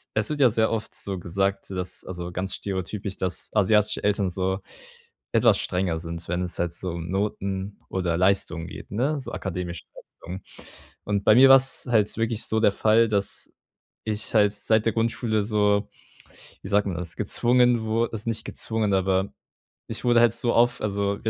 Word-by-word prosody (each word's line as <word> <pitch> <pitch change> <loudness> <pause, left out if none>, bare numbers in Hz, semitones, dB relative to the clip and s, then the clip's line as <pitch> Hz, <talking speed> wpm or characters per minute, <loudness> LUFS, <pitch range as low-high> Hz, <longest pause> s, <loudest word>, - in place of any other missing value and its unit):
es 110 -1 0
wird 150 - -3
ja 130 -3 +6
sehr 110 0 +1
oft 110 -1 -3
so 95 -2 -4
gesagt, 95 +3 -2
dass 90 -1 -4
also 90 -1 -6
ganz 95 +2 -3
stereotypisch, 95 +1 -4
dass 90 -1 -3
asiatische 105 0 +2
Eltern 100 -2 +1
so 95 +1 -1 0.7
etwas - - +4
strenger 90 -3 -1
sind, 85 0 -7
wenn 90 +1 -1
es 90 -1 -5
halt 85 -1 -1
so 90 +2 -5
um 85 0 -6
Noten 100 0 -3
oder 90 -3 -1
Leistungen 90 -3 +1
geht, 100 +1 -10
ne? 135 +8 0
So 130 - -8
akademischen 90 -2 -5
Leistungen. 90 +3 -10 0.6
Und 100 -1 -1
bei 110 - +6
mir 135 +2 +8
war's 135 0 +5
halt 110 -4 +2
wirklich 115 0 -1
so 110 - 0
der 105 - +5
Fall, 110 +3 +3
dass 100 -2 -2 0.5
ich 110 0 -2
halt 105 -2 +4
seit 110 +1 +1
der 115 - +1
Grundschule 115 -1 0
so, 105 -1 +1 0.7
wie - - -7
sagt 105 0 +2
man 95 -4 -2
das, 85 -1 -4
gezwungen 120 +3 +3
wur 115 +1 0
also 110 +1 -3
nicht 115 - -3
gezwungen, 110 -3 -1
aber 95 0 +1 0.6
ich - - -6
wurde 120 -1 +5
halt 120 -2 +4
so 120 0 0
auf 120 +1 +3
also 100 -1 -1
100 Hz, 180 wpm, -25 LUFS, 95-110 Hz, 0.7 s, mir